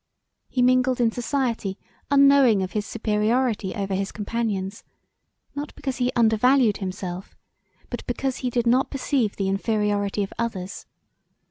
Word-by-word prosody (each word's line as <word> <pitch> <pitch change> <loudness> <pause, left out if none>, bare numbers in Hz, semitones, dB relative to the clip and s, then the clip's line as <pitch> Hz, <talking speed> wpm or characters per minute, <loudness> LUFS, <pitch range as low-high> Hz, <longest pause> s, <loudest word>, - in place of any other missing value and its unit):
He 250 - +1
mingled 255 0 +3
in 235 -2 +3
society 235 -5 -2 0.3
unknowing 275 -7 +5
of 185 - -4
his 210 -1 -2
superiority 220 -1 0
over 195 -1 -2
his 195 +1 -1
companions, 205 -2 -3 0.7
not 290 +1 -6
because 265 -2 -4
he 250 -1 +1
undervalued 230 0 +4
himself 185 -1 -6 0.6
but - - -4
because 270 -2 -2
he 255 - -2
did 240 -1 0
not 250 +3 +3
perceive 260 -5 0
the 195 - -1
inferiority 205 0 0
of 195 - -6
others. 195 -5 -4
225 Hz, 135 wpm, -24 LUFS, 200-255 Hz, 0.7 s, unknowing